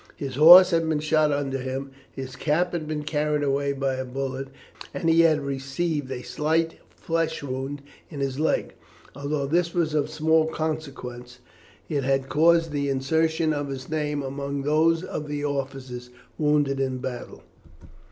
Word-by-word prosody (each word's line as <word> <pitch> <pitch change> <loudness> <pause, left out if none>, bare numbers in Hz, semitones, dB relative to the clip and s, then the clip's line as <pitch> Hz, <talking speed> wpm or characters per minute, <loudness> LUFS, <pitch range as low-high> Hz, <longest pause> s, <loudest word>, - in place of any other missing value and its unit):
His 135 -2 -5
horse 175 +7 +9
had 165 -1 +1
been 155 -2 +1
shot 155 0 +2
under 140 -2 -1
him, 135 +1 -4 0.2
his 130 -1 -7
cap 160 +6 0
had 160 -3 -3
been 150 -1 -3
carried 150 0 0
away 140 0 +1
by 135 -1 -1
a 130 - -2
bullet, 135 +1 -4 0.5
and 170 - -2
he 165 0 +5
had 160 -3 +4
received 140 +1 -3
a 125 -1 -5
slight 160 +6 -1
flesh 165 -2 -2
wound 135 +1 -4 0.3
in 150 - -8
his 135 0 -2
leg. 160 - 0 0.4
Although 140 +1 -2
this 170 +4 0
was 165 -3 +1
of 150 -1 +1
small 160 +1 +2
consequence, 140 -6 -5 0.5
it 145 -4 -1
had 135 0 0
caused 165 +1 +4
the 140 -1 -1
insertion 160 +4 +1
of 145 -1 -3
his 135 -2 -6
name 150 -2 -1
among 140 +1 -4
those 160 +3 +2
of 150 -4 -5
the 145 0 -3
officers 130 -3 -4 0.3
wounded 145 -2 +1
in 135 -1 0
the 130 - -5
battle. 125 -2 -8
145 Hz, 165 wpm, -25 LUFS, 135-160 Hz, 0.5 s, horse